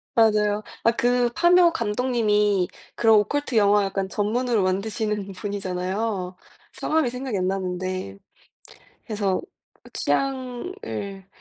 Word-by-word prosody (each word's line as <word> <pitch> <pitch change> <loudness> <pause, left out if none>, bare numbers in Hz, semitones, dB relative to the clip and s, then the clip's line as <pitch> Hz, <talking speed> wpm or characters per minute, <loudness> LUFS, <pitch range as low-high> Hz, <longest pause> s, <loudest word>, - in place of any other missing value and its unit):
맞아요. 210 -2 +3 0.2
아 230 - +5
그 245 +1 +2
파묘 345 0 +5
감독님이 210 - +1 0.3
그런 225 -2 +5
오컬트 265 +4 -1
영화 205 -1 +4
약간 195 0 -2
전문으로 225 +1 0
만드시는 205 +1 -1
분이잖아요. 190 0 -3 0.4
성함이 310 -5 0
생각이 250 -4 -4
안 185 0 0
나는데 185 - -3 0.9
그래서 205 -4 0 0.5
취향을 255 - -3
210 Hz, 260 characters per minute, -24 LUFS, 195-245 Hz, 0.9 s, 아